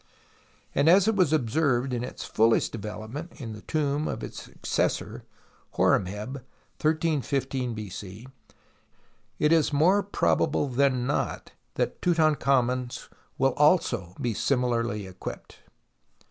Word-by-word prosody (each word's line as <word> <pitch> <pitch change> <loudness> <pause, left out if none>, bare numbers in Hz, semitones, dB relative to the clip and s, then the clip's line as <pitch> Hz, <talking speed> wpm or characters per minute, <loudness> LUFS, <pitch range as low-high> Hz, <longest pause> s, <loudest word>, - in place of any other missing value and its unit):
and 140 +3 +3
as 190 +3 +6
it 220 - +3
was 180 -7 +3
observed 130 -2 +1
in 120 -1 -2
its - - -6
fullest 115 +1 +2
development 110 - -7
in 115 -5 -6
the 105 - -10
tomb 150 -1 -1
of - - -4
his - - -7
successor, - - -3 0.5
Horemheb(131 105 +8 0 0.4
.5 140 -5 0
B.C.), 105 +2 -8 1.1
it 150 - +2
is 160 -2 +3
more 175 +8 +4
probable 195 -6 +1
than 130 -1 +2
notthat 140 - -3
Tutankhamen's 135 -7 +1 0.3
will 135 -1 +2
also 145 - +2
be 120 -2 -1
similarly 120 -4 0
equipped. 95 -1 -9
135 Hz, 110 wpm, -27 LUFS, 115-155 Hz, 1.1 s, as